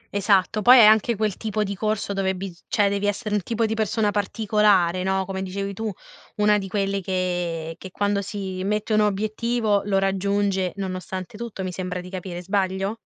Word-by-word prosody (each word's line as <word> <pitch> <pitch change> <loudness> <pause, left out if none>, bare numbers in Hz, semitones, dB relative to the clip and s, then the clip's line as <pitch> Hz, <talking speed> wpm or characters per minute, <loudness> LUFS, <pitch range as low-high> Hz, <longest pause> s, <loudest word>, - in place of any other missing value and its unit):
Esatto. 200 +1 +2
Poi 250 +4 +8
è 235 - +9
anche 220 +2 +5
quel 210 -2 -1
tipo 215 -1 -1
di 200 -1 -3
corso 215 0 -1
dove 190 -1 0
bis 180 -2 -8
cioè 205 -2 +2
devi 200 0 0
essere 210 +1 -2
un 210 - +2
tipo 230 +4 -1
di 220 - -1
persona 220 -1 0
particolare, 205 -3 +2
no, 190 0 0
come 190 0 -4
dicevi 195 +1 -4
tu, 220 +2 -3 0.4
una 210 0 +3
di 195 - -5
quelle 195 0 -1
che 175 -3 -2
che 190 - -8
quando 200 +1 0
si 190 -2 -5
mette 210 +2 -1
un 215 - +4
obiettivo 215 +1 +1
lo 195 -2 +1
raggiunge 195 -1 0
nonostante 185 0 -5
tutto, 225 -4 -6
mi 185 - -3
sembra 180 0 -4
di 180 0 -9
capire. 180 -2 -6
Sbaglio? 195 +2 -1
200 Hz, 190 wpm, -23 LUFS, 190-210 Hz, 0.4 s, è